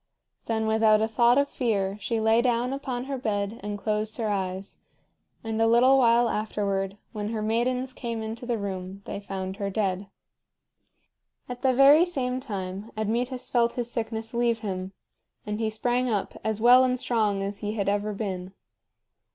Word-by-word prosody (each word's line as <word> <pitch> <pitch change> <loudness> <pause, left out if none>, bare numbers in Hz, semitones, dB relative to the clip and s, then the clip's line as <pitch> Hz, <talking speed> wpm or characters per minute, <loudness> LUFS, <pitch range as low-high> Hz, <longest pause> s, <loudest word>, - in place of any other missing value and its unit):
Then 220 -1 0
without 220 -1 +4
a 220 - +1
thought 235 +3 +4
of 280 0 +3
fear 200 -8 -1
she 225 +3 -1
lay 220 +1 +4
down 245 +1 +1
upon 260 -3 -3
her 270 0 -4
bed 210 -1 -2
and 205 0 -4
closed 215 +1 -1
her 225 -3 -1
eyes; 190 -1 -4 0.6
and 225 0 -2
a 225 - +4
little 255 +4 +5
while 240 -1 +4
afterward, 200 -3 -2
when 210 -1 -4
her 220 -1 -3
maidens 250 +4 0
came 230 -4 -4
into 225 +2 -6
the 240 -2 0
room 195 -1 -5
they - - -5
found 190 -1 -5
her 200 -2 -2
dead. 195 -1 -1 1.4
At 245 0 -7
the 260 -1 +2
very 280 +5 +7
same 255 -7 -2
time 200 -4 -5
Admetus 245 +4 -2
felt 235 -1 +2
his 240 -1 -3
sickness 225 -1 -4
leave 235 -1 +1
him, 190 -3 -4 0.5
and 210 0 -3
he 220 -1 0
sprang 245 +3 0
up 210 -3 -2
as 220 -1 -1
well 245 +3 +7
and 255 0 +1
strong 215 -5 0
as 200 0 -4
he 210 0 -3
had 205 -3 -2
ever 205 +1 0
been. 190 -3 -4
220 Hz, 175 wpm, -26 LUFS, 205-240 Hz, 1.4 s, very